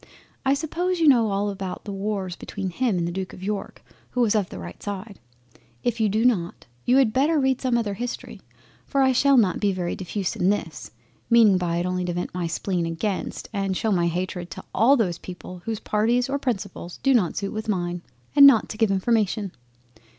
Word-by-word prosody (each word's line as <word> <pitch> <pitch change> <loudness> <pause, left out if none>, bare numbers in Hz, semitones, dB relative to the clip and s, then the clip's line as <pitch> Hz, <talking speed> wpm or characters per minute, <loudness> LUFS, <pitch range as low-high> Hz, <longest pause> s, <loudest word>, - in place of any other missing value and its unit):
I 270 0 +3
suppose 345 +5 -2
you 325 - +4
know 235 -6 +5
all 200 +1 0
about 190 -2 -6
the 205 - -5
Wars 195 -2 -3
between 190 0 -5
him 235 -1 0
and 170 -1 0
the - - -3
Duke 190 +1 -5
of 185 - -11
York 205 0 -4 0.3
who 250 - -1
was 225 -4 +3
of 205 -4 0
the - - -8
right 85 -1 -9
side; 200 0 -6 0.6
if 240 -1 -1
you 220 -1 +3
do 220 +4 +1
not, 185 -9 0 0.2
you 250 - +4
had 250 -5 +4
better 295 +5 +3
read 265 -2 +1
some 250 -3 +1
other 215 -4 -1
History, 240 +4 -6 0.5
for 275 -1 +2
I 265 - +4
shall 275 +2 +4
not 200 -6 +3
be 205 -1 +2
very 180 -2 -2
diffuse 190 0 -3
in 180 - +2
this, 165 -9 -3 0.4
meaning 220 -5 +6
by 170 -1 -1
it 175 - -1
only 180 0 -1
to 175 - -2
vent 175 +1 -4
my 175 -1 -2
spleen 175 0 -2
against, 175 +4 -3
and 195 -2 -1
shew 220 - 0
my 175 -3 +2
Hatred 180 +1 -3
to - - -8
all 255 +7 +5
those 180 -7 0
people 180 0 -9
whose 225 -2 -3
parties 235 +4 +1
or 280 +1 -1
principles 200 -8 -4
do 270 - +4
not 205 -9 +2
suit 200 -1 -3
with 215 0 -5
mine, 175 -3 -1 0.3
and 280 -1 +10
not 250 -6 +5
to 215 - -6
give 225 -2 +3
information. 205 0 +1
205 Hz, 215 wpm, -24 LUFS, 180-240 Hz, 0.6 s, and